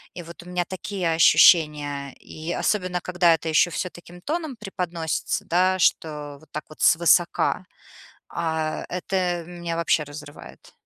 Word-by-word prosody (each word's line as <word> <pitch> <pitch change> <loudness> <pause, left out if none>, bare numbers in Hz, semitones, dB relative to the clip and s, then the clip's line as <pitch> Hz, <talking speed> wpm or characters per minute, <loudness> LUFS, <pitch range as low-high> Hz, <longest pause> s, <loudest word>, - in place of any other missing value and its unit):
И 175 - -7
вот 170 +1 -12
у - - -16
меня 180 -1 -1
такие 185 -2 -3
ощущения. 150 -4 +4
И 160 +2 -7
особенно 185 -4 -1
когда 175 -1 +3
это 160 - -8
ещё 160 +3 +3
всё 180 +3 -3
таким 175 +1 -14
тоном 310 - -3
преподносится, 175 -6 -3
да, 185 +2 +2
что 150 -4 0
вот 155 -1 -21
так 150 - -5
вот 155 - -13
свысока, 170 +2 +3 0.7
а 160 -2 -2
это 180 -1 -2
меня 175 -1 -5
вообще 155 -2 +1
разрывает. 145 - -12
170 Hz, 145 wpm, -24 LUFS, 155-180 Hz, 0.7 s, ощущения